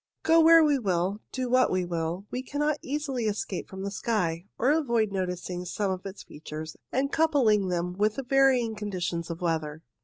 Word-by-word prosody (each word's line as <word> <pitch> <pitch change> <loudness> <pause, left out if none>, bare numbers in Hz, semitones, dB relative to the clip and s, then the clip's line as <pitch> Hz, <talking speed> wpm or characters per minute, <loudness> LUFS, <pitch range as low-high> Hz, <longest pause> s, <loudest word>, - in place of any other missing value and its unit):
Go 325 +1 +5
where 330 0 +8
we 290 -3 +3
will, 190 -1 -1
do 255 -1 -2
what 255 +1 +4
we 185 -1 0
will, 170 +2 -3
we 250 - -2
cannot 295 +3 -1
easily 275 -4 -3
escape 205 -3 -3
from 190 0 -7
the 200 - -3
sky, 190 -5 -1
or 255 +4 +3
avoid 235 -9 +1
noticing 180 -1 -3
some 195 +2 -2
of 185 +1 -4
its 195 +1 -9
features 155 +1 -8 0.2
and 275 +2 0
coupling 250 -11 +3
them 180 0 -1
with 210 +2 +1
the 270 - -4
varying 255 -3 +3
con 210 0 -5
ditions 170 -3 -3
of 170 +1 -6
weather. 160 -2 -2
205 Hz, 190 wpm, -27 LUFS, 180-260 Hz, 0.2 s, where